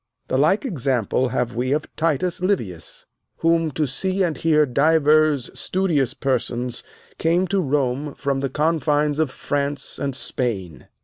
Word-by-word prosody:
The -, -, +1 dB
like 175 Hz, -, +3 dB
example 130 Hz, -, 0 dB
have 125 Hz, -1 st, -1 dB
we 125 Hz, +3 st, -1 dB
of 150 Hz, 0 st, 0 dB
Titus 165 Hz, +3 st, 0 dB
Livius, 115 Hz, -, -2 dB, 0.3 s
whom 165 Hz, -1 st, +2 dB
to 155 Hz, -, 0 dB
see 190 Hz, +8 st, -1 dB
and 165 Hz, -4 st, 0 dB
hear 155 Hz, -2 st, +3 dB
divers 150 Hz, 0 st, +3 dB
studious 170 Hz, -9 st, 0 dB
persons 125 Hz, -2 st, -2 dB, 0.4 s
came 170 Hz, +3 st, +2 dB
to 195 Hz, 0 st, +2 dB
Rome 140 Hz, -1 st, -1 dB
from 140 Hz, -2 st, -1 dB
the 135 Hz, 0 st, -1 dB
confines 150 Hz, -1 st, +1 dB
of 160 Hz, -3 st, +2 dB
France 140 Hz, +1 st, -3 dB
and 140 Hz, -2 st, -2 dB
Spain. 100 Hz, -, -3 dB
145 Hz, 140 wpm, -22 LUFS, 130-160 Hz, 0.4 s, like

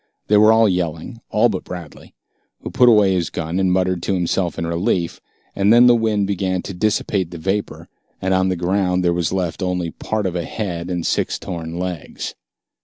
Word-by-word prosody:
They 105 Hz, -, +5 dB
were 110 Hz, +1 st, +6 dB
all 110 Hz, 0 st, +5 dB
yelling, 90 Hz, +5 st, -3 dB
all 110 Hz, +3 st, +3 dB
but 100 Hz, -5 st, -3 dB
Bradley, 85 Hz, -5 st, -10 dB, 0.5 s
who -, -, -6 dB
put 125 Hz, -, +5 dB
away 105 Hz, -4 st, +5 dB
his 90 Hz, -3 st, -1 dB
gun 80 Hz, +3 st, -3 dB
and 95 Hz, -1 st, +2 dB
muttered 90 Hz, -1 st, +1 dB
to 95 Hz, -, -1 dB
himself 90 Hz, 0 st, -1 dB
in 85 Hz, -, -2 dB
relief, 85 Hz, +1 st, -1 dB, 0.3 s
and 100 Hz, +1 st, +3 dB
then 120 Hz, +2 st, +7 dB
the 120 Hz, -, +7 dB
wind 110 Hz, -3 st, +1 dB
began 95 Hz, -2 st, -1 dB
to 100 Hz, -, -6 dB
dissipate 100 Hz, -1 st, 0 dB
the 85 Hz, -, -8 dB
vapor, 95 Hz, +5 st, -3 dB, 0.3 s
and 95 Hz, 0 st, 0 dB
on 95 Hz, 0 st, +2 dB
the 95 Hz, -, 0 dB
ground 90 Hz, +1 st, 0 dB
there 85 Hz, -, +3 dB
was 85 Hz, -2 st, -1 dB
left 90 Hz, -2 st, -2 dB
only 90 Hz, -2 st, -1 dB
part 110 Hz, +4 st, -3 dB
of 90 Hz, -2 st, -2 dB
a 85 Hz, -, -1 dB
head 85 Hz, -2 st, -4 dB
and 90 Hz, -2 st, -2 dB
six -, -, 0 dB
torn 85 Hz, -1 st, -6 dB
legs. 90 Hz, -3 st, -5 dB
95 Hz, 200 wpm, -20 LUFS, 85-100 Hz, 0.5 s, then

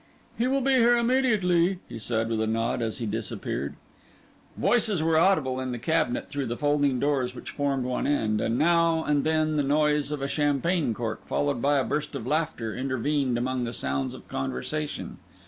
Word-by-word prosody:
"He 240 Hz, -, 0 dB
will 270 Hz, +1 st, +1 dB
be 270 Hz, +1 st, +2 dB
here 240 Hz, -1 st, +5 dB
immediately," 210 Hz, -8 st, +2 dB
he 115 Hz, -, -8 dB
said, 115 Hz, +1 st, -1 dB
with 110 Hz, -1 st, 0 dB
a 110 Hz, -, 0 dB
nod, 115 Hz, +2 st, 0 dB
as 110 Hz, -1 st, -2 dB
he 120 Hz, -, -3 dB
disappeared. 105 Hz, -, -3 dB, 0.8 s
Voices 210 Hz, -8 st, +2 dB
were 160 Hz, 0 st, +2 dB
audible 155 Hz, -7 st, +3 dB
in 130 Hz, -1 st, -3 dB
the 120 Hz, -, -3 dB
cabinet 150 Hz, 0 st, 0 dB
through 140 Hz, -2 st, -3 dB
the 120 Hz, +1 st, -3 dB
folding 145 Hz, -3 st, +1 dB
doors 130 Hz, -3 st, 0 dB
which -, -, -8 dB
formed 140 Hz, -2 st, -1 dB
one 125 Hz, 0 st, -1 dB
end; 110 Hz, -7 st, +1 dB
and 115 Hz, -, 0 dB
now 165 Hz, 0 st, +3 dB
and 145 Hz, -1 st, +1 dB
then 155 Hz, -1 st, +1 dB
the -, -, +3 dB
noise 150 Hz, +1 st, +2 dB
of 145 Hz, -2 st, -3 dB
a -, -, 0 dB
champagne 145 Hz, -1 st, +1 dB
cork, 115 Hz, -2 st, -4 dB
followed 145 Hz, -4 st, 0 dB
by 145 Hz, +2 st, +3 dB
a 135 Hz, -, +2 dB
burst 150 Hz, +2 st, -3 dB
of 110 Hz, -, -5 dB
laughter, 150 Hz, -6 st, -1 dB
intervened 130 Hz, 0 st, 0 dB
among 125 Hz, +1 st, -1 dB
the 120 Hz, 0 st, -3 dB
sounds 70 Hz, -, -2 dB
of -, -, -13 dB
conversation. 65 Hz, -, -4 dB
145 Hz, 190 wpm, -26 LUFS, 120-160 Hz, 0.8 s, here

